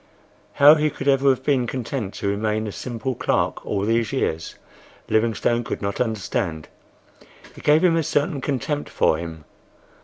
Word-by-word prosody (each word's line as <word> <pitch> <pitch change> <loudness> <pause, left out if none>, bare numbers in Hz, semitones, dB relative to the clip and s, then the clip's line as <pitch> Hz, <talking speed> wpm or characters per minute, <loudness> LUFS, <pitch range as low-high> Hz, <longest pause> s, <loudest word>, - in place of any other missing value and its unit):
How 145 +2 +8
he 155 -1 +2
could 140 -1 -7
ever 135 0 +4
have 130 -1 +1
been 130 -4 +1
content 120 -4 -4
to - - -3
remain 105 +2 -1
a 105 - -4
simple 125 +4 -4
clerk - - -1
all 100 - -2
these 115 0 +1
years, 80 -12 -2 0.5
Livingstone 115 +2 +1
could - - -4
not 100 +2 -2
understand. 100 -7 -2 0.9
It - - -11
gave 150 +3 +4
him 175 -2 +4
a 165 - +2
certain 145 0 -1
contempt 145 +2 -2
for 80 - +2
him. 80 -2 -8
120 Hz, 160 wpm, -22 LUFS, 105-140 Hz, 0.9 s, How